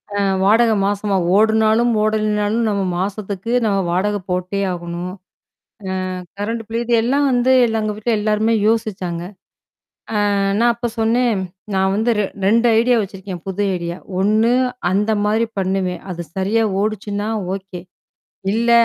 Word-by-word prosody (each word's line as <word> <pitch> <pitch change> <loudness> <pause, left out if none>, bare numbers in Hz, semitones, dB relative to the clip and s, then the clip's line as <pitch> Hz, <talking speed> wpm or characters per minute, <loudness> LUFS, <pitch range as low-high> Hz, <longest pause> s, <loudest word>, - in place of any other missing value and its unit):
அ, - - 0 0.2
வாடகை 225 +3 +4
மாசமா, 205 0 0 0.2
ஓடுனாலும் 220 +2 +3
ஓடலைனாலும் 215 +1 +1
நாம 200 -1 0 0.2
மாசத்துக்கு, 200 +2 -4
நாம 200 -2 +1
வாடகை 205 +3 0
போட்டே 180 +2 -2
ஆகணும். 175 +1 -5 1.0
அ - - -5 0.2
கரண்ட் 225 +2 -2
பில். 230 +1 -3
இது 240 0 +1
எல்லாம் 280 +4 +2
வந்து, 250 +1 +3
இல்ல 225 -1 0
எங்க 210 -1 -2
வீட்டுல 225 +2 -1
எல்லாருமே 215 +2 +1
யோசிச்சாங்க. 190 -6 -1 1.1
அ - - +1 0.2
நான் 240 0 +4
அப்ப 235 +1 -3
சொன்னேன். 230 +1 +2 0.4
நான் 190 0 +2
வந்து 225 +3 +1
ரெ 205 - +2 0.2
2 230 +4 +4
ஐடியா 245 0 +3
வச்சிருக்கேன், 190 -3 -7
புது 195 +2 -2
ஐடியா. 170 0 -4 0.2
ஒண்ணு, 215 +4 +3 0.4
அந்த 205 +3 +1
மாரி 220 +2 +2
பண்ணுவேன். 185 -1 -1
அது 170 0 -5
சரியா 215 +4 +1 0.2
ஓடுச்சுன்னா 210 0 -2 0.3
ஓகே. 190 -2 -7 0.7
இல்ல, 235 +1 +1
210 Hz, 135 wpm, -19 LUFS, 195-225 Hz, 1.1 s, வாடகை